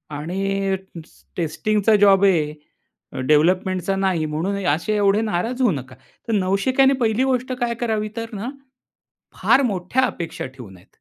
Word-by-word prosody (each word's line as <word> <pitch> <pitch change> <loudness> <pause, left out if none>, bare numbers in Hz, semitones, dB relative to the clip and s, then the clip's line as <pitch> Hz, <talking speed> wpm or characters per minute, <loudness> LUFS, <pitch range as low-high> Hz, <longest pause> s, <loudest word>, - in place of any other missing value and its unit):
आणि 195 +5 -1 0.3
स - - -24
टेस्टिंगचा 210 +6 +1
जॉब 200 -1 +5
आहे 150 -6 -3
डेव्हलपमेंटचा 185 +4 +2
नाही 190 -5 0
म्हणून 165 +6 -2
असे 160 +8 0
एवढे 205 +1 +3
नाराज 225 +5 -2
होऊ 245 -5 +4
नका." 130 -4 -6 0.3
तर 230 - -1
नवशिक्याने 220 +8 +2
पहिली 225 +2 +2
गोष्ट 255 -1 0
काय 235 -1 0
करावी 215 -2 -1
तर 230 0 -5
ना 215 +4 -4 0.9
फार 275 - +5
मोठ्या 205 +2 0
अपेक्षा 170 - -5
ठेवू 125 -6 -12
नयेत. 90 -1 -17
195 Hz, 140 wpm, -21 LUFS, 165-220 Hz, 0.9 s, जॉब